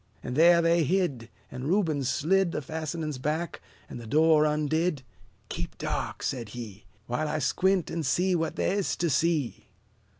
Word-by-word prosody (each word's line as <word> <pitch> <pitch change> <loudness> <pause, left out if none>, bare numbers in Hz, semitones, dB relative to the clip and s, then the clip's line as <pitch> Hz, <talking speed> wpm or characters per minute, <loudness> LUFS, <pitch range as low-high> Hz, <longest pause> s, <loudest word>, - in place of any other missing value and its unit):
And 125 - -4
there 170 +2 +6
they 165 0 +3
hid; 150 -9 0 0.2
And 130 +1 -6
Reuben 165 -7 +1
slid 170 +7 +1
The 150 - -3
fastenings 155 -1 -4
back, 155 +5 -2 0.3
and 120 - -8
the 115 - -10
door 155 +4 +4
undid. 150 0 0 0.5
"Keep - - -5
dark!" - - -3
said 120 -5 -3
he, 110 -4 -8 0.2
"While 125 +7 -2
I 155 - -1
squint 185 +6 +1
an' 165 - -2
see 175 +6 +1
what 165 -2 -1
the' - - -1
is 200 0 0
to 170 -2 0
see." 150 - 0
155 Hz, 165 wpm, -27 LUFS, 135-170 Hz, 0.5 s, there